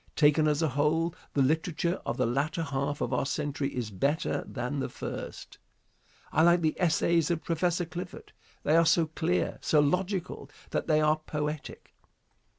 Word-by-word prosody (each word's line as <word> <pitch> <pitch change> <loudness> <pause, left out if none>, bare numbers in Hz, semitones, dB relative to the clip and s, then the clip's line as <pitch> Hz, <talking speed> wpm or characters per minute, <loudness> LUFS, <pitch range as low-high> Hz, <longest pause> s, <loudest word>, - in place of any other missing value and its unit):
Taken 150 +1 +4
as 150 +1 +1
a 160 - +2
whole, 155 +5 +1 0.2
the 140 - +4
literature 160 +5 0
of - - -2
the - - +2
latter 145 +7 0
half 140 -1 -2
of 125 - -1
our 125 - +1
century 145 -1 -2
is 120 -4 -3
better 140 - 0
than 135 +4 -3
the - - -2
first. - - -7 0.7
I 155 - +3
like 175 +1 +5
the 155 -1 +2
essays 165 -1 +2
of 170 -2 -1
Prof. 175 +1 0
Clifford. 175 +2 -7 0.3
They 155 - +3
are 165 0 +5
so 165 +1 +4
clear, 160 +3 -1
so 155 - +3
logical 180 +5 -1 0.2
that - - -1
they 155 -1 +3
are 155 0 +3
poetic. 150 0 -4
155 Hz, 165 wpm, -29 LUFS, 145-170 Hz, 0.7 s, like